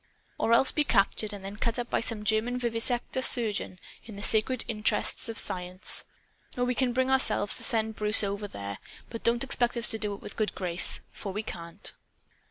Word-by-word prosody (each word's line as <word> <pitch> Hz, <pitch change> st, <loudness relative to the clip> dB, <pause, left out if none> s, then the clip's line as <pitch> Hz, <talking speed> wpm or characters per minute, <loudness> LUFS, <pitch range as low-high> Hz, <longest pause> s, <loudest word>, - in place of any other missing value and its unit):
Or 225 Hz, -, 0 dB
else 235 Hz, +3 st, +4 dB
to -, -, -7 dB
be 300 Hz, -, +3 dB
captured 215 Hz, -3 st, 0 dB
and 200 Hz, -2 st, -9 dB
then 200 Hz, +1 st, -7 dB
cut 230 Hz, +1 st, -2 dB
up 245 Hz, -1 st, -5 dB
by -, -, +1 dB
some 225 Hz, -2 st, -1 dB
German 220 Hz, +3 st, 0 dB
vivisector 240 Hz, +2 st, +1 dB
surgeon 220 Hz, -7 st, 0 dB, 0.3 s
in 220 Hz, -2 st, -12 dB
the 200 Hz, -, -7 dB
sacred 225 Hz, +3 st, +1 dB
interests 215 Hz, 0 st, -1 dB
of 225 Hz, -, -4 dB
Science! 180 Hz, +1 st, +3 dB, 0.5 s
Oh, 245 Hz, -, 0 dB
we 250 Hz, 0 st, 0 dB
can 250 Hz, 0 st, 0 dB
bring 260 Hz, +2 st, 0 dB
ourselves 260 Hz, -5 st, +3 dB
to -, -, -1 dB
send 220 Hz, -4 st, +1 dB
Bruce 210 Hz, +1 st, +4 dB
over 200 Hz, +1 st, -4 dB
there! 100 Hz, -, -8 dB, 0.3 s
But 230 Hz, -, -7 dB
don't 235 Hz, +1 st, +2 dB
expect 245 Hz, -2 st, -1 dB
us 235 Hz, -, +3 dB
to 220 Hz, -, -3 dB
do 210 Hz, -2 st, -4 dB
it -, -, -15 dB
with -, -, -8 dB
a -, -, -27 dB
good 215 Hz, -1 st, -2 dB
grace. 180 Hz, -2 st, +4 dB
For 200 Hz, -, -7 dB
we 210 Hz, +3 st, -5 dB
can't." 170 Hz, -1 st, -6 dB
220 Hz, 210 wpm, -27 LUFS, 205-240 Hz, 0.5 s, else